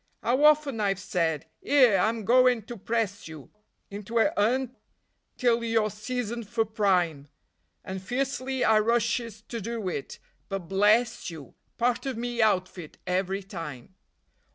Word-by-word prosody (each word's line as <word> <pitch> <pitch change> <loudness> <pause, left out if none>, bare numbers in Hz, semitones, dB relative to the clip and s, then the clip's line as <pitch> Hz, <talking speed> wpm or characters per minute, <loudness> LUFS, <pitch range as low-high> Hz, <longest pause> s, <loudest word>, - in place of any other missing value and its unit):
'Ow 260 +5 +2
often 300 -5 +4
I've 200 -2 +1
said: 165 -5 -1 0.2
"'Ere, 250 -9 +5
I'm 220 +1 0
goin' 250 -1 +4
to 240 - -8
press 210 -2 -2
you 155 -4 -11 0.4
Into 205 +3 -5
a 225 - +3
'Un 255 +4 +1 0.6
till 235 -1 +2
you're 225 -2 +1
seasoned 235 0 -4
for 230 -2 +1
prime," 180 -9 0 0.6
And 190 0 -5
fiercely 260 +3 -2
I 220 -1 +5
rushes 230 -1 0
to 230 0 -6
do 225 -1 -4
it, 140 - -5 0.3
but 195 -4 -4
bless 210 +5 +2
you! 160 -5 -10 0.2
Part 240 0 0
of 260 -4 -3
me 240 0 -2
outfit 185 -6 0
every 190 +2 -1
time. 165 - -8
220 Hz, 140 wpm, -27 LUFS, 190-240 Hz, 0.6 s, Ere